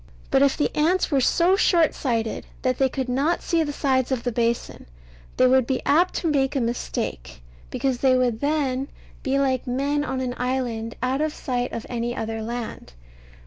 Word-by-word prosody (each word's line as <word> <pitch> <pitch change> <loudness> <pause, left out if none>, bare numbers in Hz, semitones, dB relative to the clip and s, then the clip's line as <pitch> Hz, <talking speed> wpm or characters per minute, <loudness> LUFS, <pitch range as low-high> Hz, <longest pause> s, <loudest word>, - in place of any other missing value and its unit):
But 270 - +4
if 280 -1 +3
the 295 - 0
ants 335 +4 +2
were 275 -2 +3
so 350 +8 +3
short 340 -5 +3
sighted 230 -4 -2 0.2
that 255 -1 0
they 265 -1 +3
could 260 0 -3
not 275 +7 0
see 335 -1 +1
the 300 -2 -1
sides 265 -3 0
of 255 -3 -1
the 245 - -1
basin, 235 - -2 0.5
they 255 - +5
would 255 -1 +4
be 265 -2 0
apt 345 +5 +3
to 340 - -1
make 275 -3 +1
a - - +2
mistake, 65 - -3 0.3
because 255 - -1
they 260 -1 +4
would 245 -3 +1
then 280 -3 0 0.3
be 270 -1 0
like 265 -2 0
men 280 +4 0
on 265 -2 -3
an 255 -1 -2
island 245 -3 -2
out 260 +3 0
of 310 0 -1
sight 245 -1 -2
of 230 - -5
any 240 0 -3
other 225 0 -3
land. 235 - -6
260 Hz, 190 wpm, -24 LUFS, 240-285 Hz, 0.5 s, they